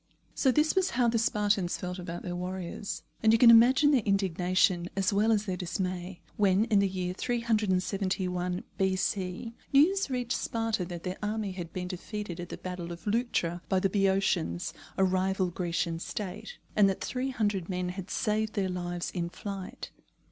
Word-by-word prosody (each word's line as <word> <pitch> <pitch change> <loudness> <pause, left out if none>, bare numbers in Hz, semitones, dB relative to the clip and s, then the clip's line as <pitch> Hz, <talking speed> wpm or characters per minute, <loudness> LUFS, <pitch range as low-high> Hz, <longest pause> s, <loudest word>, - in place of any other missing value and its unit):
So 265 - +3
this 300 +4 +3
was 380 -1 +3
how 245 -2 +4
the 230 0 +1
Spartans 205 -4 +1
felt 180 0 -5
about 175 -1 -6
their 175 -1 -4
warriors; 180 +2 -4 0.2
and 220 - +5
you 225 - +6
can 230 0 +8
imagine 255 +6 +7
their 270 -4 +4
indignation 185 -2 +1
as 195 +1 +1
well 210 +3 +3
as 215 -1 +2
their 190 -3 -2
dismay 180 0 -4 0.2
when, 200 +1 +4
in 215 -4 +3
the 200 - +3
year 185 -1 -3
371 190 -5 0 0.2
B.C., 190 +2 -1 0.2
news 335 +6 +4
reached 245 -2 -1
Sparta 225 -4 -1
that 175 -1 -7
their 185 0 -4
army 210 -1 -2
had 175 -3 -6
been 180 -1 -4
defeated 185 0 -5
at 175 0 -6
the - - -6
battle 180 -2 -6
of 170 0 -9
Leuctra 205 -6 0
by 190 - +3
the 195 0 +1
Boeotians, 190 - +1 0.2
a 190 - +3
rival 185 0 +1
Grecian 170 -1 -2
State, 205 - -6 0.2
and 205 -2 +6
that 190 - -2
three 260 +1 -2
hundred 205 -8 -1
men 180 -1 -2
had 185 +1 -6
saved 215 0 0
their 195 -3 0
lives 175 -1 -3
in 170 -2 -2
flight. 195 +1 -7
190 Hz, 175 wpm, -29 LUFS, 180-215 Hz, 0.2 s, can